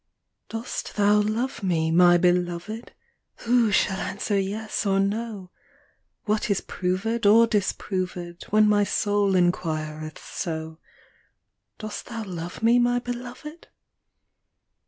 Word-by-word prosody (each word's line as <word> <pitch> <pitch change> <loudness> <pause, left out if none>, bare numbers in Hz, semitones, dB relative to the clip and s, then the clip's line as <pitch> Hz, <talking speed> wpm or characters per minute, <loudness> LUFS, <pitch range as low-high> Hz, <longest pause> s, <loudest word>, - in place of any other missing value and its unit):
Dost 225 +2 -5
thou 205 0 +4
love 225 +6 -2
me, 165 -4 0
my 175 +1 +6
Beloved? 175 +5 -1 0.5
Who 235 -2 +3
shall 190 0 +2
answer 200 +1 -2
yes 205 +4 -2
or 195 -2 +2
no? 200 -2 -2 0.7
What 215 0 0
is 200 - +2
proved 205 +5 -1
or 225 +3 +7
disproved 185 -4 -3
When 215 0 +4
ray 205 0 +4
soul 205 -1 +1
inquireth 155 -3 -1
so, 160 -2 -5 1.0
Dost 215 -1 -7
thou 230 -2 -5
love 175 0 -7
me, 235 +2 +5
my 245 0 +2
Beloved 245 +6 -7
205 Hz, 115 wpm, -25 LUFS, 180-225 Hz, 1.0 s, or